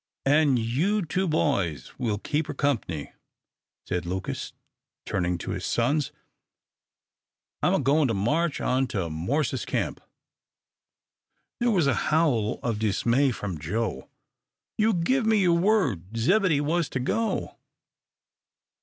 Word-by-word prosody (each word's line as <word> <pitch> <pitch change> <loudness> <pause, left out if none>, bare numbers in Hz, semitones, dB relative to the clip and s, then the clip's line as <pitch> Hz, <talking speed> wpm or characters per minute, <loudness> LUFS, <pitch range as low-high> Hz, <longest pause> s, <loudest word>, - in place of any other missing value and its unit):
"An' 145 -1 +4
you 160 - 0
two 185 +4 -1
boys 100 - 0
will 115 -5 0
keep 150 +8 -2
her 145 - -5
comp'ny," 115 - -1 0.7
said 90 -2 -1
Lucas, 95 +1 -4 0.5
turning 90 -2 -1
to 90 - -5
his 95 -1 -4
sons. 135 +4 +1 1.5
"I'm - - +3
a - - +2
goin' 145 +1 +3
to 115 - 0
march 150 - 0
on 130 +1 +1
to 95 -9 -3
Morse's 120 - -1
camp." - - -2 1.6
There 240 - +2
was 185 -9 +3
a 140 - +3 0.2
howl 135 -9 +2
of 115 -3 -1
dismay 115 +6 +2
from 100 -9 -4
Joe. 85 - -3 0.7
"You 215 -1 +3
give 220 +8 +1
me 220 -1 +4
your 170 -2 +3
word 135 - +1
Zebedee 165 - +3
was 165 +2 0
to 130 - -2
go." 220 - -1
135 Hz, 130 wpm, -26 LUFS, 105-165 Hz, 1.6 s, An